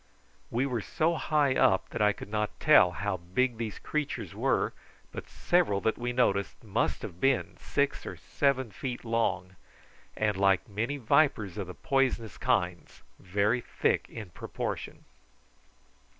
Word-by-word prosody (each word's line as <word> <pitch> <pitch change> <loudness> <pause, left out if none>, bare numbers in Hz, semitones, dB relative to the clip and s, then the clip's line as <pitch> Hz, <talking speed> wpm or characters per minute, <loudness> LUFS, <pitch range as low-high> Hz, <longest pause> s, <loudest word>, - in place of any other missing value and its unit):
We 125 +4 0
were 125 -5 -1
so 165 - 0
high 150 -4 +2
up 95 -6 +3
that - - -4
I 105 0 +5
could - - -8
not 105 -1 -2
tell 145 -12 +6
how 100 +2 -2
big 110 +8 -1
these 110 -3 -4
creatures 150 -2 -3
were, - - +1 0.4
but - - -8
several 175 - +1
that 110 - +1
we 120 0 -1
noticed 100 -6 0
must 105 -3 -1
have 85 - -8
been 135 -1 +1
six - - -1
or - - -5
seven 130 -5 0
feet 130 -4 -5
long, 95 -6 -1 0.6
and 105 -2 +1
like 95 -1 +3
many 115 +8 -2
vipers 135 - +2
of 100 -4 -4
the 90 - -8
poisonous 135 - 0
kinds, 90 -1 -1 0.2
very 100 +6 +1
thick - - 0
in 110 -6 -8
proportion. - - -5
115 Hz, 150 wpm, -29 LUFS, 100-135 Hz, 0.6 s, tell